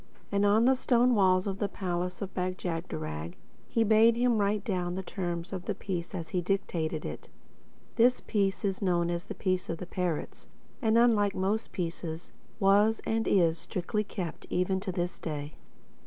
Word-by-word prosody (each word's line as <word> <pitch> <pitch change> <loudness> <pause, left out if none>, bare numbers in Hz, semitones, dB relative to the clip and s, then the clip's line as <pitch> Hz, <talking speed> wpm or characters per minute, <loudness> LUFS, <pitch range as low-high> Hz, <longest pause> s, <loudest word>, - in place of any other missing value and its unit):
And 200 0 +3
on 215 +3 +4
the 265 - +6
stone 250 -1 +3
walls 185 -3 +4
of 195 -1 -3
the 205 - +1
palace 180 -1 -3
of 190 - -7
Bag 185 0 -2
jagderag 85 - -4 0.3
he 230 - +2
bade 225 +1 +5
him 240 -2 +2
write 205 0 +1
down 180 -3 -1
the 190 - -3
terms 175 -1 -4
of 180 -2 -5
the - - -2
peace 180 -1 -4
as 165 -3 -5
he 180 - 0
dictated 170 -4 -1
it. - - -7 0.7
This 245 +2 +5
peace 200 0 0
is 195 0 -1
known 175 -3 +1
as 170 0 -3
The - - -7
Peace 185 -2 -1
of 165 - -2
The 180 - -6
Parrots, 180 -3 -3 0.3
and—unlike 220 -3 +4
most 200 +4 -1
peaces—was, 195 +5 0
and 225 0 0
is, 165 -4 +3
strictly 205 +4 -2
kept—even 180 0 -2
to 190 0 -4
this 175 0 -3
day. 150 -1 -5
190 Hz, 170 wpm, -29 LUFS, 175-210 Hz, 0.7 s, the